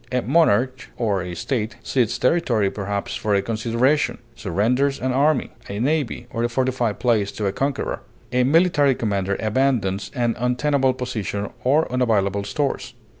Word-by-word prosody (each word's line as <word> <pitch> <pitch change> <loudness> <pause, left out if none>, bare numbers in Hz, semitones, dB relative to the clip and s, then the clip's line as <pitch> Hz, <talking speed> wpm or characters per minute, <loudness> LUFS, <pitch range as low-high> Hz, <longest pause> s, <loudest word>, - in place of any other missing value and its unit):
A 125 -1 0
monarch 130 -4 +2
or 105 -6 0
a 90 0 -5
state 110 +4 -2
cedes 125 -4 0
territory 120 - +2
perhaps 100 0 -3
for 105 -1 0
a 100 - +3
consideration; 115 +7 +1 0.2
surrenders 120 +8 0
an 130 +1 -1
army, 140 +2 +2 0.2
a 100 +1 -4
navy, 140 -2 0
or 115 -1 -2
a 120 - +1
fortified 125 -3 0
place 115 -5 +1
to 105 - -3
a 100 - +1
conqueror; 135 +4 -2 0.3
a 125 0 +3
military 145 -1 +4
commander 100 -4 -1
abandons 110 -5 0
an 120 -2 +1
untenable 130 +2 +1
position 110 -5 -3
or 145 +5 +3
unavailable 100 -6 +1
stores. 140 +7 -2
120 Hz, 150 wpm, -22 LUFS, 105-130 Hz, 0.3 s, military